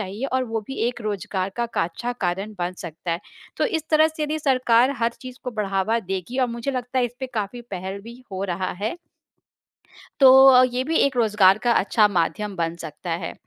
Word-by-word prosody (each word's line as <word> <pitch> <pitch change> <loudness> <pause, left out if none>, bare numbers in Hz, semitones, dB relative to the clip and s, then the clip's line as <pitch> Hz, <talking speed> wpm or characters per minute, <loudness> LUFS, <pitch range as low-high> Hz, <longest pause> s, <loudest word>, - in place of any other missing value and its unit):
चाहिए 205 +6 -4
और 260 0 +1
वो 225 -2 -3
भी 270 - -5
एक 245 - -6
रोज़गार 195 -2 -2
का 235 - 0
का 230 -8 -1
अच्छा 235 +9 -4
कारण 195 +5 -2
बन 175 0 -2
सकता 170 +2 -6
है। 170 - -3 0.4
तो - - +1
इस 320 -9 -3
तरह 310 0 +5
से 315 0 -6
यदि 300 +1 -1
सरकार 255 -3 +3
हर 235 0 +1
चीज़ 255 0 -9
को 250 - -3
बढ़ावा 210 0 0
देगी 195 +7 -3
और 255 - +3
मुझे 235 +3 -3
लगता 255 -1 -3
है 250 - +3
इस 240 0 -4
पे 260 - -2
काफ़ी 215 +3 -3
पहल 190 +1 -5
भी 235 +2 -11
हो 190 0 -3
रहा 185 0 -2
है। 220 +9 -2 1.2
तो 270 - +9 0.3
अ, 255 - +8
ये 250 0 -1
भी 320 +2 -1
एक 275 -2 +2
रोज़गार 210 -4 +4
का 240 +2 +1
अच्छा 210 0 +3
माध्यम 200 +2 -1
बन 165 -1 -1
सकता 165 +1 -8
है। - - -4
225 Hz, 215 wpm, -23 LUFS, 190-255 Hz, 1.2 s, तो